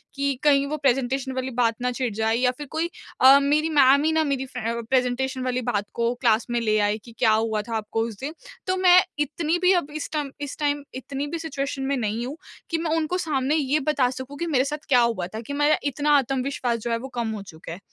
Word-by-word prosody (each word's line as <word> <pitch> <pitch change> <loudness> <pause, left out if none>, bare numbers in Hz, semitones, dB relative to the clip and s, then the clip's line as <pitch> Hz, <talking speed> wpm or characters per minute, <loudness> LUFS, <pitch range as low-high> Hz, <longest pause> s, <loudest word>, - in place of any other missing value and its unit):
कि 280 0 0
कहीं 280 -2 +4
वो 305 - -3
प्रेजेंटेशन 265 -1 0
वाली 260 0 -3
बात 230 -2 +3
ना 250 0 0
छिड़ 245 -2 -2
जाए 220 +1 +1
या 250 +1 +2
फिर 295 -1 -7
कोई 330 +2 -1 0.3
अ, 270 +2 +9
मेरी 295 +3 +1
मैम 280 0 +6
ही 315 - +2
ना 315 0 +2
मेरी 275 -2 -1
फ्रे 235 -2 -4
प्रेजेंटेशन 260 0 0
वाली 255 0 -1
बात 205 0 0
को 235 0 0
क्लास 230 -2 +3
में 240 - 0
ले 215 -1 +2
आए, 205 +1 +1
कि 230 +2 -15
क्या 225 -3 +4
हुआ 220 -1 0
था 230 - -3
आपको 220 +1 -2
उस 220 -4 -9
दिन? 290 +4 -5 0.3
तो 370 - +1
मैं 365 -1 +7 0.2
इतनी 305 +3 0
भी 365 - +5
अब 300 -5 0
इस 310 - -4
टाइम 295 -3 -2
इस 285 - -5
टाइम 290 -1 0
इतनी 270 +2 -4
भी 330 +3 -4
सिचुएशन 280 -4 -4
में - - +2
नहीं 225 +1 -2
हूँ 285 +5 -6 0.3
कि 335 - 0
मैं 325 -1 -2
उनको 325 +3 -1
सामने 295 -4 0
ये 295 0 +1
बता 275 -3 +1
सकूँ 260 +2 -7
कि 340 - -3
मेरे 265 -5 +2
साथ 300 +1 -5
क्या 250 -3 +5
हुआ 230 -7 0
था, 215 +4 -7
कि 260 +5 -7
मेरा 295 +1 +3
इतना 290 +1 0
आत्मविश्वास 260 -2 -1
जो 235 +2 -4
है 230 - +1
वो 260 +3 -7
कम 230 - -1
हो 205 - -6
चुका 165 -3 -11
है। 170 - -7
265 Hz, 245 wpm, -24 LUFS, 235-295 Hz, 0.3 s, अ